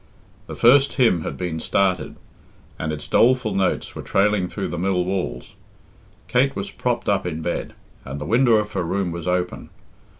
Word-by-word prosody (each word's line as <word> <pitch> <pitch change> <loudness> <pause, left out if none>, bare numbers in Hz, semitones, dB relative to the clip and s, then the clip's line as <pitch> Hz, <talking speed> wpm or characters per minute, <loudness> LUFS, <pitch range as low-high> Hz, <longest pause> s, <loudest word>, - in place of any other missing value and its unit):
The - - -7
first 135 +4 +5
hymn 115 - +3
had - - -5
been 85 -3 -3
started, 95 +2 0 0.6
and 80 - -2
its 75 -1 -6
doleful 125 -3 +3
notes 95 -1 0
were - - -5
trailing 100 -1 +1
through 100 +2 -4
the 85 - -4
mill 90 -1 0
walls. 90 -9 -3 0.7
Kate - - +2
was - - -4
propped - - -2
up - - +1
in 80 -2 -4
bed, 85 - -3 0.3
and 70 +2 -6
the 75 - -5
window 120 - +4
of 105 -1 0
her 95 - -2
room 90 +1 -1
was 85 0 -6
open. 90 0 -2
95 Hz, 175 wpm, -22 LUFS, 85-105 Hz, 0.7 s, first